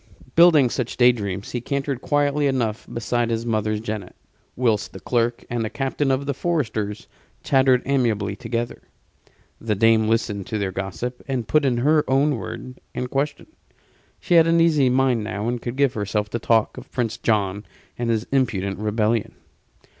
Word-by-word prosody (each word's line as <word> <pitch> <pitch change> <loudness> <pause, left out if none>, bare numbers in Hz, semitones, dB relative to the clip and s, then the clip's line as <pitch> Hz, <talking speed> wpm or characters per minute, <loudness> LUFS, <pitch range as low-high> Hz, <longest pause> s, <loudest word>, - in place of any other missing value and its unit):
Building 160 -7 +6
such 125 -3 -3
day 125 0 +7
dreams, 100 -4 -5
he 120 - -3
cantered 140 0 -2
quietly 145 0 +1
enough 120 -5 -1
beside 120 0 -1
his 115 0 -2
mother's 110 -2 0
jennet; 105 -4 -6 0.4
whilst 115 -4 0
the - - -8
clerk 120 -1 -1
and 120 -1 -2
the 110 - -2
captain 135 +3 -1
of 135 +1 0
the 140 - -1
foresters 115 -10 -2 0.4
chattered 130 -2 +3
amiably 110 -7 0
together. 120 +1 -4 0.8
The 110 -2 -1
dame 110 +1 +4
listened 110 -3 -1
to 110 - -2
their 100 -2 -2
gossip, 100 +7 -5
and 130 -5 -2
put 155 -2 +3
in 125 -3 +2
her 150 +5 +3
own 140 +1 +2
word 125 +3 -8
and 125 0 -3
question; 140 +1 -2 0.7
she 180 - -1
had 165 -1 +6
an 165 0 +3
easy 155 -6 +4
mind 125 -3 +2
now 105 +1 -3
and 120 0 -2
could 120 0 -4
give 140 -2 +2
herself 105 0 -2
to 120 - -2
talk 115 +1 +1
of 130 - -15
Prince 120 -3 -2
John 100 -2 0 0.3
and 120 -1 -2
his 115 0 0
impudent 100 -8 0
rebellion. 110 +1 0
120 Hz, 170 wpm, -23 LUFS, 110-135 Hz, 0.8 s, day